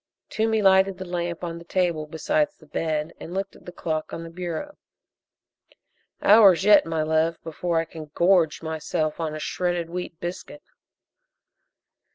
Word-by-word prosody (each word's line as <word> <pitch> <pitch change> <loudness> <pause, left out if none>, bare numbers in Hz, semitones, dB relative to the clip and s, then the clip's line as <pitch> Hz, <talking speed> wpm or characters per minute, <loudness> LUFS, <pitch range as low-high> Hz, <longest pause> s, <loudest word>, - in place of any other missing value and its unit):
Toomey 220 -1 +1
lighted 190 0 +4
the 185 - -6
lamp 175 -1 -3
on 170 -1 -4
the - - -12
table 170 -3 -1
beside 295 - +1
the 155 - -18
bed 155 0 -2
and 175 - -8
looked 195 0 -3
at - - -18
the - - -6
clock 160 -3 -3
on 165 - -5
the 165 - -9
bureau. 180 - -5 1.5
"Hours 200 -4 +7
yet, 205 -4 +6
my 160 -1 0
love, 160 +1 +1
before 165 +2 -2
I 165 - +1
can 160 -1 -9
gorge 170 -3 +3
myself 160 0 -2
on 155 -2 -2
a - - -5
shredded 175 0 -2
wheat 175 -2 -5
biscuit." 185 +12 -7
170 Hz, 160 wpm, -24 LUFS, 160-190 Hz, 1.5 s, Hours